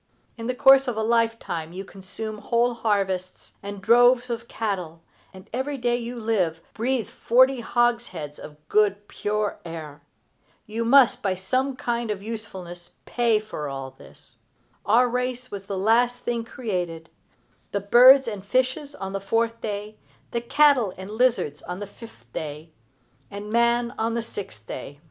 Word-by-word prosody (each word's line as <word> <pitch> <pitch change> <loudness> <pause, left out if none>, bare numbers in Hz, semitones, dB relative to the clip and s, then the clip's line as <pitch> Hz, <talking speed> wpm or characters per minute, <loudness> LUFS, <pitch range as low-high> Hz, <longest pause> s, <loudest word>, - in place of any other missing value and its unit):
In 230 -1 -6
the 250 - -1
course 270 +1 +6
of 240 -3 -2
a 220 - 0
lifetime 225 -8 0
you 190 +2 -6
consume 210 +3 -7
whole 240 +2 +1
harvests, 195 -5 -2
and 200 -1 -7
droves 245 +3 +5
of 235 0 -4
cattle, 180 -8 -4 0.3
and 190 0 -14
every 270 +3 -2
day 240 -1 +1
you 240 0 -5
live 210 -8 0
breathe 245 +1 -1
forty 260 +2 +3
hogsheads 235 - -1
of 150 -1 -10
good 205 -1 +2
pure 210 0 -2
air. 155 -3 -8 0.6
You 225 +2 -3
must, 265 +1 +5
by 190 -2 0
some 255 +9 -1
kind 240 -2 -2
of 200 -2 -3
usefulness, 185 -6 -7 0.2
pay 235 -3 +2
for 155 -9 -6
all 135 -1 -6
this. 135 - -18 0.5
Our 235 +4 +5
race 250 +1 -2
was 200 -1 -6
the 195 -1 -4
last 240 +5 +2
thing 235 -1 -2
created, 180 -9 -4 0.6
the 200 - 0
birds 250 +6 +7
and 205 -4 -4
fishes 260 +6 0
on 195 -6 -6
the 195 - -3
fourth 230 +3 0
day, 210 0 -5 0.3
the 235 - -1
cattle 255 -5 +3
and 190 +2 -8
lizards 220 - +1
on 180 +2 -6
the 205 - -4
fifth 200 - -14
day, 155 +1 -6 0.6
and 205 +1 -7
man 235 +1 +2
on 225 +1 0
the 235 - -1
sixth 190 - -8
day. 140 +5 -8
220 Hz, 160 wpm, -24 LUFS, 190-240 Hz, 0.6 s, birds